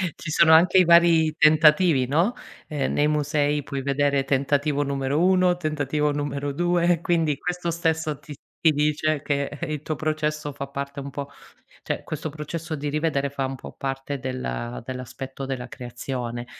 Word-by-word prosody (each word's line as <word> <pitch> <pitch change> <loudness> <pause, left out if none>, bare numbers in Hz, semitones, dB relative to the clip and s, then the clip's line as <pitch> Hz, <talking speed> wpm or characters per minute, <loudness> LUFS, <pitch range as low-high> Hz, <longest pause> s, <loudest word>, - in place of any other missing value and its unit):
Ci 155 - -6
sono 160 +1 +5
anche 175 +4 +6
i 185 - +5
vari 170 -2 +5
tentativi, 155 -2 +5
no: 170 - +2 0.3
ehm, 145 -3 -2
nei 145 - +2
musei 150 -1 0
puoi 140 -1 -4
vedere 140 0 +1
tentativo 140 +2 +1
numero 140 +1 -1
1, 185 -1 +4
tentativo 150 -2 -1
numero 145 -1 -3
2, 175 +1 +2
quindi 165 -5 +1
questo 180 +2 -3
stesso 160 -2 -1
ti 145 0 -10 0.2
ti 160 - +4
dice 150 0 0
che, 140 -1 -1 0.2
eh, - - -3
il 150 -1 -4
tuo 155 - -3
processo 155 -1 -2
fa 140 0 -6
parte 140 +1 -5
un 140 0 -6
po' 140 0 -6 0.5
cioè - - -3
questo 155 +1 -4
processo 155 +2 -5
di 145 0 -3
rivedere 145 -2 0
fa 135 -1 -2
un 135 - -4
po' - - -10
parte 135 +1 -4
della 125 - -4
dell'aspetto 130 +1 -7
della 130 -2 -4
creazione. 120 -1 -5
145 Hz, 165 wpm, -24 LUFS, 140-155 Hz, 0.5 s, anche